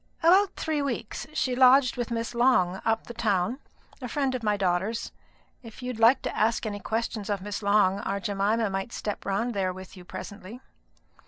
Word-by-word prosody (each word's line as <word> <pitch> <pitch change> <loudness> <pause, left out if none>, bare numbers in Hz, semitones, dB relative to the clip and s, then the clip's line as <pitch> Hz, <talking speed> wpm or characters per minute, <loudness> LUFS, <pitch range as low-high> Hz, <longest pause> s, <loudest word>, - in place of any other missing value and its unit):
"About 380 +4 +5
three 310 -2 -1
weeks. 255 -5 -4
She 255 -4 0
lodged 255 0 +6
with 240 -2 -3
Miss 230 0 -3
Long, 195 -7 +3
up 225 0 0
the 240 - -8
town, 220 +1 0 0.4
a 250 - -4
friend 270 +1 -1
of 255 - -3
my 210 -2 +1
daughter's. 195 +4 -1 0.5
If 230 +1 -12
you'd 250 -2 -4
like 235 +4 +5
to - - -3
ask 225 +1 +1
any 205 -1 -3
questions 220 0 -3
of 205 -1 0
Miss 205 +1 -4
Long, 200 -1 +3
our 200 0 -2
Jemima 205 +2 0
might 195 +4 -3
step 210 - -4
round 225 +5 0
there 190 -3 0
with 185 +2 -10
you 180 - -11
presently." 205 +5 -9
225 Hz, 185 wpm, -27 LUFS, 200-245 Hz, 0.5 s, lodged